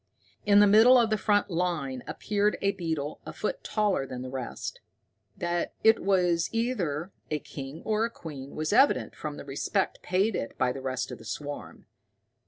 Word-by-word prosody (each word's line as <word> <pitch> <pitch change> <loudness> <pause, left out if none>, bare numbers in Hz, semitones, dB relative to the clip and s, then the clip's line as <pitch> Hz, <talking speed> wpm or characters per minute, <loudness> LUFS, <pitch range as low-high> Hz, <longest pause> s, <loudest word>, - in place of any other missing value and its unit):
In 205 0 +7
the - - +8
middle 220 +5 +7
of 225 -2 +2
the - - +4
front 205 -1 +2
line 165 -7 -1
appeared 210 0 0
a 200 - +2
beetle 160 -6 -3
a - - -7
foot - - -3
taller 205 -10 0
than 125 -1 -6
the 130 - -6
rest. 130 -2 -5 0.6
That 175 0 -2
it 220 0 +6
was 180 -4 +2
either 195 - -1 0.2
a 155 - 0
king 140 +1 -8
or 220 +1 +1
queen 145 -10 -9
was 155 +4 -1
evident 270 +5 +4
from 150 -1 -5
the - - -8
respect 145 +8 -1
paid 190 +3 +1
it 115 - -4
by 125 - +2
the 135 - -6
rest 130 0 -3
of 125 - -7
the - - -12
swarm. 145 +5 -6
175 Hz, 180 wpm, -28 LUFS, 140-210 Hz, 0.6 s, the